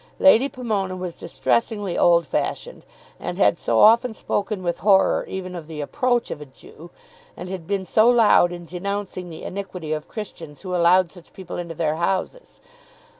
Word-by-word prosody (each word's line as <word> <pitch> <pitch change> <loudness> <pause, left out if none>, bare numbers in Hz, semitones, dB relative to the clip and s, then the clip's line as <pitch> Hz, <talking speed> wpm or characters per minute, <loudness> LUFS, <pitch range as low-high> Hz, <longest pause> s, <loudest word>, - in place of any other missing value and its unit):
Lady 275 -1 +5
Pomona 215 -9 -3
was 180 -2 -6
distressingly 205 -5 -1
old 170 -1 +4
fashioned, - - -3 0.3
and - - -5
had - - +3
so - - +1
often 230 +2 +5
spoken 205 -2 -3
with 175 -1 -2
horror 195 -1 +3
even 185 -1 -5
of 170 -4 -8
the 160 -2 -8
approach 245 - 0
of 150 - -6
a - - -7
Jew, 150 +4 -15 0.5
and 180 +1 -7
had 185 -4 -6
been 195 -2 -1
so 220 +5 +4
loud 225 -7 +5
in 175 -1 -8
denouncing 185 +1 -5
the 160 - -9
iniquity 180 -5 -5
of 155 -1 -5
Christians 170 -8 -8
who 185 -2 -5
allowed 175 0 +4
such 175 -3 -16
people 185 -2 -8
into 170 -2 -6
their 155 -1 -1
houses! 190 - -3
185 Hz, 175 wpm, -22 LUFS, 170-210 Hz, 0.5 s, Lady